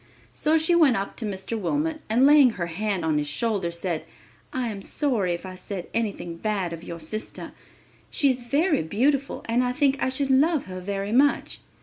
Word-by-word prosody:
So 315 +1 +2
she 320 +2 +2
went 310 -9 +5
up 195 +1 -4
to 230 - -4
Mr. 195 +3 -4
Wilmot 300 - -1
and 240 +5 +4
laying 290 -2 +7
her 175 - -1
hand 185 +1 -2
on 155 -2 +2
his 145 - -2
shoulder, 195 +4 -1
said, 170 -1 -3 0.5
"I 255 -2 -2
am 200 -3 -6
sorry 220 - 0
if 170 - -9
I 185 - -7
said 185 0 -7
anything 200 -7 -2
bad 195 -3 -2
of 165 0 -8
your 170 -1 -7
sister. 215 +8 -5 0.6
She 280 -2 +3
is 250 -1 -4
very 280 - +1
beautiful 265 - 0
and 235 +2 +2
I 250 - 0
think 280 0 +2
I - - +2
should 270 +1 -1
love 295 +3 +3
her 185 0 -7
very 200 +2 -3
much. 275 +5 +2
220 Hz, 200 wpm, -25 LUFS, 185-275 Hz, 0.6 s, laying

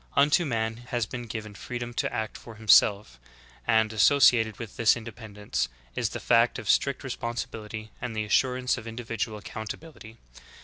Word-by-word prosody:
Unto 145 +5 +4
man 115 -4 -1
has 120 -3 -1
been 120 +2 -7
given 110 -1 -6
freedom 120 +3 -6
to - - -1
act 110 +1 -3
for 115 - -11
him 110 0 -13
self; 100 - +5 0.5
and, 110 -1 +3
associated 115 -1 +5
with 115 -4 -8
tliis 115 -2 +4
independence, 105 - -4 0.3
is - - 0
the - - -5
fact - - +3
of - - -7
strict - - +2
responsibility 110 -2 -5
and 120 -2 -4
the 110 0 -1
assurance 125 +3 +1
of 115 - -10
individual 115 -1 -4
account 105 +2 -6
ability. 120 -9 -14
110 Hz, 165 wpm, -27 LUFS, 110-120 Hz, 0.5 s, self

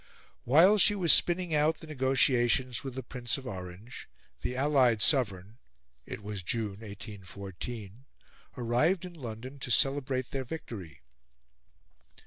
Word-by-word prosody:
While 175 - +6
she 205 +2 +6
was 180 -5 +5
spinning 175 -1 +2
out 150 +1 +2
the - - -11
negotiations 130 -3 +1
with 135 -2 -6
the 130 - -5
Prince 125 +4 -2
of 135 - -10
Orange, 95 +2 -8 0.3
the 125 - -3
allied 130 -5 +3
sovereign 105 - 0 0.5
it - - -7
was 105 -1 -5
June, 105 0 -2
1814 100 +2 -8 0.5
arrived 125 +10 +1
in 180 - -9
London 130 -1 -8
to 130 - -6
celebrate 135 0 +1
their 135 -1 -2
victory. 100 - -8
125 Hz, 125 wpm, -30 LUFS, 105-140 Hz, 0.5 s, While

